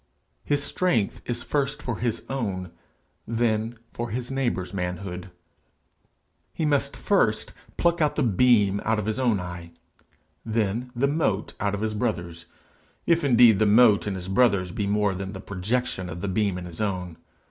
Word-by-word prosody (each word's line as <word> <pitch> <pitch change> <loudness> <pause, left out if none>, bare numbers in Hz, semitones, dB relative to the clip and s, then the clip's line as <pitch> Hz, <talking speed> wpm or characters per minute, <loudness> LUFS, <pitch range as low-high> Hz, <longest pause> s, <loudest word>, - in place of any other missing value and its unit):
His 145 0 +1
strength 140 - 0
is 120 -1 -3
first 145 0 -1
for 120 -3 -3
his 120 -2 -1
own, 100 -9 -3 0.6
then 115 0 0 0.2
for 120 0 -4
his 120 +4 -3
neighbour's 120 -9 -1
manhood. 90 0 -4 1.2
He 160 - -2
must 145 -2 +1
first - - +1 0.2
pluck 170 0 +2
out 150 - +2
the - - +1
beam 105 -3 +3
out 110 0 +1
of 105 - -2
his 110 +2 -2
own 120 -6 +2
eye, 85 -2 -7 0.7
then 115 +2 -1
the 125 +4 +2
mote 140 -9 0
out 100 +1 0
of 100 - -5
his 110 0 -1
brother's 85 -7 -3 0.6
if 170 -1 +3
indeed 120 -6 +6
the 110 - +4
mote 105 -1 +5
in 100 - -1
his 90 -1 -6
brother's 95 -3 +2
be 100 +2 -2
more 105 -1 +1
than 95 +1 -5
the 95 - -7
projection 100 0 -2
of 85 0 -6
the 100 - -2
beam 100 -1 0
in 90 - -6
his 85 +2 -7
own. 90 -5 -2
105 Hz, 170 wpm, -25 LUFS, 95-125 Hz, 1.2 s, indeed